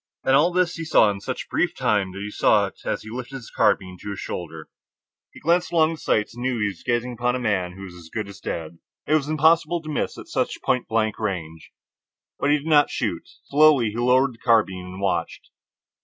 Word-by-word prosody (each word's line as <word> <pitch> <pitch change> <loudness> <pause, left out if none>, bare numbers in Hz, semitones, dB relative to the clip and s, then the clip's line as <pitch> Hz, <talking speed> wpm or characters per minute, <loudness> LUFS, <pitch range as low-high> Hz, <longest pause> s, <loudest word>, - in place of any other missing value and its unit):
And 135 - +3
all 155 +6 +4
this 180 -1 +1
he 165 - -4
saw 135 -9 +4
in 100 - -6
such 130 +5 -5
brief 175 0 0
time, 105 - +1
that 100 +1 -6
he 105 - -6
saw - - +3
it - - -10
as - - -2
he 110 - -9
lifted 125 +2 -6
his 125 -4 -9
carbine 90 -1 +1
to - - -6
his 100 -1 -5
shoulder. 80 -5 -6 0.6
He - - -14
glanced 170 +2 +1
along 160 -1 +3
the 160 - -7
sights, 105 0 0
and 120 - -9
knew 130 0 0
that 115 - -3
he 105 - +2
was 95 -4 -10
gazing 120 +1 -1
upon 120 +1 0
a - - -2
man 95 -7 -1
who 95 +2 -10
was 95 -2 -9
as 85 -2 -13
good 110 -3 -3
as 100 - -11
dead. 80 0 -5 0.3
It 150 - 0
was 150 -2 +2
impossible 165 +2 +3
to 155 - -8
miss 145 - -2
at - - -9
such - - -2
point 125 - 0
blank 110 -1 0
range. 80 -7 -4 0.7
But 140 - +1
he 150 - +4
did 145 - -9
not 150 -2 +4
shoot. - - -3
Slowly 145 -6 +4
he 110 - -7
lowered 125 +2 +3
the 115 - -19
carbine 105 -6 +2
and 90 +1 -9
watched. 85 -4 -2
120 Hz, 235 wpm, -23 LUFS, 100-145 Hz, 0.7 s, all